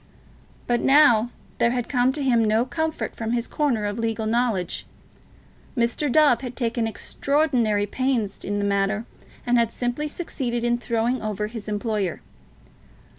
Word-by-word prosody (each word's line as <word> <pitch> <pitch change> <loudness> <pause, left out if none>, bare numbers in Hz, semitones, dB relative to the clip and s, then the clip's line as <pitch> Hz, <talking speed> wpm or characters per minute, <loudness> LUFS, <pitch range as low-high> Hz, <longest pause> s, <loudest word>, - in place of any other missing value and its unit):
But 240 -1 +1
now 270 -5 +5 0.3
there 235 - +4
had 245 -1 -2
come 250 -1 +2
to 295 0 -3
him 240 -4 +3
no 220 +2 +2
comfort 320 +3 -3
from 225 0 -3
his 235 -1 0
corner 255 -8 0
of 205 +2 -3
legal 225 -1 -1
knowledge. 220 -6 -1 0.9
Mr. 240 +4 +1
Dove 285 -5 +5
had 250 -2 -6
taken 235 -2 -1
extraordinary 240 -4 0
pains 235 -3 -1
in 205 +1 -2
the 205 - 0
matter, 200 +2 0 0.4
and 245 0 +3
had 230 -1 +1
simply 245 +5 -2
succeeded 255 -7 -3
in 240 0 +1
throwing 235 +1 0
over 210 -1 -2
his 220 0 -7
employer. 210 -4 -2
235 Hz, 150 wpm, -24 LUFS, 215-255 Hz, 0.9 s, now